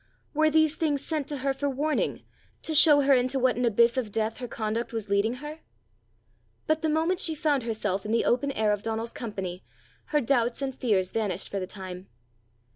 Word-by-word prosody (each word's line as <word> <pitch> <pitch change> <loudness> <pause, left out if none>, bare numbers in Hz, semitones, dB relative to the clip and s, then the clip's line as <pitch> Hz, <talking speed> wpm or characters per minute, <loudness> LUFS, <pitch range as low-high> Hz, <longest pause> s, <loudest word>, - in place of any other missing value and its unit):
Were 310 +1 +3
these 315 0 +3
things 290 -3 0
sent 310 -4 -2
for 295 - -3
her 275 +1 -1
warning, 295 +3 -1 0.4
to 320 - -2
show 295 -1 +7
her 275 0 +4
into 255 +1 +2
what 255 -1 +2
an 245 - 0
abyss 235 +2 +3
of 230 -5 -2
death 220 +1 -1
her 250 - -5
conduct 225 +1 -3
was 220 -3 -4
leading 205 +4 +2
her? 295 +4 -8 1.1
But 310 0 +1
the 315 - 0
moment 325 +4 +1
she 320 - -1
found 295 -3 +1
herself 215 -4 -2
in 210 - -4
the 230 - +2
open 265 +3 +1
air 215 -3 +1
of 205 -1 -1
Donal's 225 +1 -3
company, 190 -5 -5 0.4
her 300 - +1
doubts 240 -3 +1
and 265 -1 -2
fears 200 -8 0
vanished 205 -5 -2
for 200 - -3
the 185 - -4
time. 185 -1 -8
245 Hz, 200 wpm, -27 LUFS, 215-290 Hz, 1.1 s, show